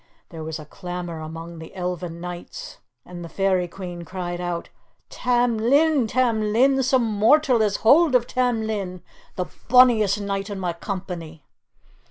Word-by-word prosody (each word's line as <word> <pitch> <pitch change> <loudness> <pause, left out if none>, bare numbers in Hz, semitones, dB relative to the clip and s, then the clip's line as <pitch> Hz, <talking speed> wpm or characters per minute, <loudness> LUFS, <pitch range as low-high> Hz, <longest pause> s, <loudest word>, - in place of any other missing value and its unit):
There 165 -2 -8
was 155 0 -4
a 155 - -10
clamour 175 0 -6
among 165 +1 -8
the 160 +3 -11
Elfin 180 -2 -4
Knights, 175 0 -8 0.3
and 175 -1 -9
the 170 - -8
Fairy 190 -1 +1
Queen 175 -1 -7
cried 175 0 -5
out, 175 -1 -3 0.4
"Tam 245 -2 +1
Lin! 280 +2 +3
Tam 220 -2 +1
Lin! 265 +4 +4
Some 255 -1 +2
mortal 235 +5 +3
has 210 -2 +2
hold 295 +3 +6
of 240 -1 +4
Tam 245 -3 0
Lin, 190 -5 -4 0.3
the 180 - -2 0.2
bonniest 235 -5 +5
knight 200 0 -3
in 200 -2 -5
my 180 -2 -2
company!" 170 -5 -6
195 Hz, 155 wpm, -23 LUFS, 175-240 Hz, 0.4 s, hold